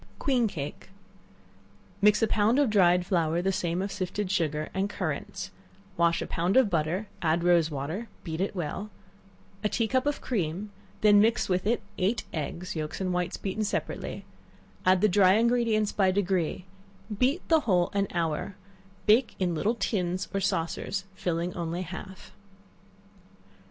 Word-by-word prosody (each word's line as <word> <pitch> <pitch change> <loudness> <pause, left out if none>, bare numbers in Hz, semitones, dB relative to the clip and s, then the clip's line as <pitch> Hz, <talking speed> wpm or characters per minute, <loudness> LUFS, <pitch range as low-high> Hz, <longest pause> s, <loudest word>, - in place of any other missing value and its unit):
Queen 255 -5 +2
Cake. 150 -2 -6 1.1
Mix 210 +2 +5
a - - +4
pound 215 +4 +2
of 285 -6 +3
dried 180 -3 +4
flour, 170 -3 +1
the 190 +2 +1
same 185 -1 -1
of 200 - -4
sifted 190 0 -3
sugar, 155 -5 0
and 195 +2 0
currants; - - -4 0.4
wash 170 0 +2
a - - -5
pound 175 +7 0
of 255 -6 +4
butter, 170 +5 0 0.2
add 165 +1 +1
rose 170 -2 +4
water 155 +10 -4 0.2
beat 160 -1 -4
it 200 +1 -1
well 180 +4 -4 0.7
a 210 - +2
tea 230 0 0
cup 260 +4 +1
of 290 - 0
cream; 200 -2 -2 0.3
then 205 -1 +7
mix 225 +3 +2
with 185 +1 0
it 230 -1 +1 0.2
eight 200 +6 +1
eggs, 170 +4 -4
yelks 155 -1 -4
and 185 -2 -1
whites 180 0 -1
beaten 205 +2 -2
separately; 210 - -3 0.6
add 185 0 +5
the 215 - +5
dry 190 -1 +5
ingredients 225 -1 +2
by 195 -2 +2
degrees; 185 -3 0 0.5
beat 260 - +1
the 325 -1 +5
whole 180 -10 +1
an 200 0 +1
hour, 170 +3 -2 0.5
bake 225 +3 +4
in 180 -2 0
little 205 +8 0
tins, 185 -5 -1
or 195 - +1
saucers, 190 +1 -2
filling 175 -1 -2
only 170 +1 -3
half. 190 +1 -9
190 Hz, 155 wpm, -28 LUFS, 175-210 Hz, 1.1 s, then